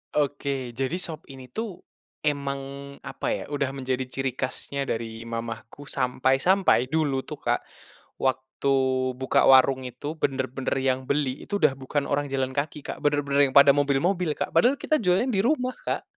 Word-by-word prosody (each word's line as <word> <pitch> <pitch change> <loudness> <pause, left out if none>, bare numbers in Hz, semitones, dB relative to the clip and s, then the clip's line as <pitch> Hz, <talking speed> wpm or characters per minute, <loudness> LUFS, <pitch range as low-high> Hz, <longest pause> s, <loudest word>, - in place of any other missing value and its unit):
Oke 140 -3 -1
jadi 135 +6 -2
sop 165 -3 -4
ini 130 -2 -11
tuh, 220 - -5 0.4
emang 140 -1 -3
apa 135 - -5
ya - - -5
udah 140 -2 -1
menjadi 130 -1 -2
ciri 130 0 -2
khasnya 140 +1 -3
dari 115 0 -4
mamaku 115 +3 -6
sampai-sampai 135 +3 +2
dulu 140 -3 0
tuh - - -5
Kak, - - +2 0.6
waktu 130 +1 -1 0.5
buka 130 - +3
warung 130 0 +6
itu 145 +5 -6
bener-bener 130 -3 -2
yang 130 0 0
beli 140 -1 -1
itu 205 -1 -2
udah 150 -5 +4
bukan 135 +2 -2
orang 145 -1 -1
jalan 130 0 -1
kaki 150 +1 -2
Kak - - -6
bener-bener 145 -1 +2
yang - - -17
pada 140 0 +7
mobil-mobil 150 +5 +1
Kak - - -4
padahal 265 +4 +4
kita 310 - +1
jualan 185 +7 +3
di 200 -5 +1
rumah, 255 -1 +1
Kak. - - -3
140 Hz, 160 wpm, -26 LUFS, 130-150 Hz, 0.6 s, pada